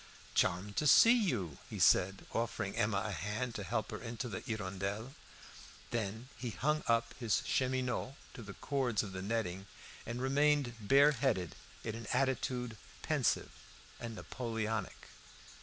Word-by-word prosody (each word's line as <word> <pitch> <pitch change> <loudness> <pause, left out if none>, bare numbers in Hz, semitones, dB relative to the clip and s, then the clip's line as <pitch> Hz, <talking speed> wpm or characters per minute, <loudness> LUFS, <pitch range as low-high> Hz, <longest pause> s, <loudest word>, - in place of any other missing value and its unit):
"Charmed 100 +4 +1
to 150 - +2
see 230 - +8
you," 120 - 0
he - - -5
said, 95 +1 +4
offering 110 -3 -1
Emma 100 -2 +1
a 105 - -2
hand 105 +7 -3
to 105 - -4
help 110 +2 -2
her 105 - -5
into 120 +1 -4
the 100 -5 -4
"Hirondelle." 105 +2 -3 0.8
Then 110 +1 -3
he 120 +2 -4
hung 150 +9 0
up 115 0 +2
his 115 -5 +1
cheminots 130 0 0 0.2
to - - -8
the 100 -3 -9
cords 130 -6 0
of 100 - -6
the 95 0 -5
netting, 95 -2 -2 0.4
and 115 +1 -3
remained 140 0 +2
bare 140 +8 +6
headed 115 - 0 0.3
in 110 - -3
an 115 -1 -7
attitude 125 -3 0 0.3
pensive - - +1 0.5
and 115 -1 -5
Napoleonic. 110 -3 -3
115 Hz, 145 wpm, -34 LUFS, 100-130 Hz, 0.8 s, see